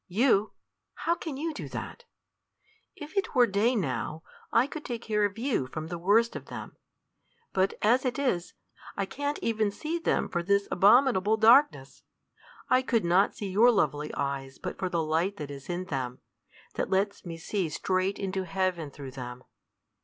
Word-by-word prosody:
"You! 210 +1 +2 0.4
How 335 - 0
can 315 -5 -5
you 320 +2 -2
do - - -7
that? - - -7 0.9
If 300 +5 -10
it 395 -6 -1
were 250 -1 +7
day 225 +4 +1
now, 160 - -2 0.3
I 230 - +4
could 300 +2 -7
take 235 -2 -5
care 210 -1 +1
of 200 +1 -3
you 235 - 0
from 155 +4 -6
the 175 0 -4
worst 215 +6 +3
of - - -6
them. - - -8 0.8
But 190 +1 +1
as 240 +5 +4
it 255 0 -1
is, 250 -12 -1 0.4
I 200 - 0
can't 285 +7 -3
even 220 -2 +1
see 310 +11 -4
them - - 0
for 175 - -2
this 200 +3 +1
abominable 215 0 +4
darkness. 220 - +4 0.7
I 255 - +4
could 235 -6 0
not 180 +4 +3
see 200 -2 -5
your 220 +6 +6
lovely 150 - +1
eyes 135 -1 -3
but - - -6
for 185 -1 -1
the 170 -2 0
light 165 +6 0
that 145 -1 -6
is 140 +2 -10
in 175 +1 -2
them; 130 -6 -3 0.6
that - - -2
lets 195 +2 0
me 170 -2 -6
see 180 0 -2
straight 185 +5 -1
into 190 -1 -2
heaven 185 -4 -1
through 140 -1 -9
them. 125 -1 -8
195 Hz, 175 wpm, -28 LUFS, 165-235 Hz, 0.9 s, were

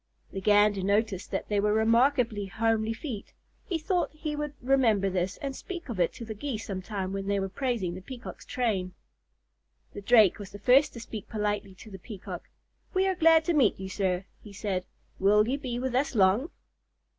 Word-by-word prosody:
The 195 - -5
Gander 205 0 +4
noticed 200 0 0
that - - -3
they 205 -1 +1
were 210 +1 +2
remarkably 230 -1 +3
homely 220 +3 0
feet. 225 -3 -6 0.3
He 345 - 0
thought 350 +3 0
he 305 -1 -4
would 295 -1 -4
remember 235 -7 +2
this 185 +1 -1
and 275 -1 -4
speak 350 -2 -7
of 220 -6 -4
it 175 - +3
to 230 - -8
the 220 - -5
Geese 225 0 -4
some 190 -2 -4
time 190 -1 -4
when 195 0 -4
they 200 0 +1
were 195 - -1
praising 225 -5 -2
the 185 - -7
Peacock's 250 +5 -9
train. 200 -7 -1 1.0
The 205 - -7
Drake 215 -2 +5
was 200 -2 -7
the 205 - -9
first 250 +8 +4
to 235 - -8
speak 220 -3 -8
politely 210 -2 -2
to 215 +3 -13
the 190 - -9
Peacock. 205 0 -8 0.5
"We 375 +1 +3
are 380 - +2
glad 325 -2 +5
to 345 - +1
meet 260 -12 +3
you, 190 0 -5
sir," 190 -1 -1 0.2
he 210 - -11
said. 190 -2 -3 0.3
"Will 210 +2 +4
you 270 +4 -1
be 245 -3 -4
with 255 0 -2
us 265 +1 0
long?" 205 - +3
215 Hz, 200 wpm, -28 LUFS, 195-255 Hz, 1.0 s, Drake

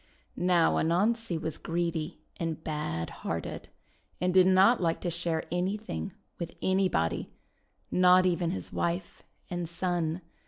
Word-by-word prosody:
Now, 175 -2 +3
Anansi 195 +3 +1
was 160 -1 -3
greedy 170 -2 -2
and 165 -1 -3
bad 115 - -3
hearted, - - -4 0.5
and 180 +1 +1
did 185 0 +6
not 190 +5 +5
like 165 -2 +1
to 175 - -1
share 170 -1 -1
anything 195 +3 -2 0.3
with 170 -1 -5
anybody, 185 - +1 0.6
not 185 0 +6
even 175 -1 +1
with 180 - -1
his - - -6
wife 170 +2 -2 0.3
and 175 -2 -3
son. 175 -1 -1
175 Hz, 130 wpm, -29 LUFS, 165-185 Hz, 0.6 s, did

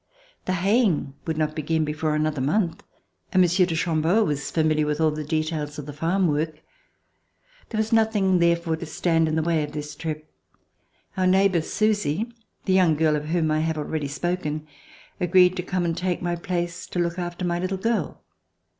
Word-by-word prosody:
The 185 - 0
haying 190 - +2
would 160 -1 -1
not 155 -1 0
begin 160 0 0
before 150 0 -1
another 150 -2 0
month, 165 +5 0 0.5
and 185 - +3
Monsieur 180 0 +4
de 165 - -2
Cham 160 -1 0
beau 185 +8 +3
was 150 -6 -2
familiar 155 -2 +1
with 150 0 -1
all 160 -1 +3
the 155 0 -4
details 155 -1 -2
of 150 - -6
the 145 - -7
farm 175 +5 +1
work. 155 +1 -2 1.1
There 220 - -4
was 220 0 0
therefore 225 -1 +5
nothing 195 -4 +1
to 170 -1 +1
stand 165 0 +1
in 155 - 0
the 160 - +1
way 165 -1 +1
of 150 0 -6
this 150 0 -5
trip. 155 -1 -5 0.9
Our 185 -1 +2
neighbor, 190 -2 +4
Susy, 210 +2 0 0.3
the 190 - +2
young 180 -4 +4
girl 155 0 +2
of 150 0 -3
whom 160 0 0
1 155 0 +1
have 160 0 -1
already 150 -1 -2
spoken, 155 0 -2 0.5
agreed 180 +1 +4
to - - 0
come 180 0 -2
and 165 -1 0
take 180 0 -1
my 175 -1 -1
place 175 0 -3
to - - -6
look 170 0 0
after 175 +1 -4
my 175 0 0
little 185 +2 -2
girl. 210 -5 -2
165 Hz, 190 wpm, -24 LUFS, 155-185 Hz, 1.1 s, therefore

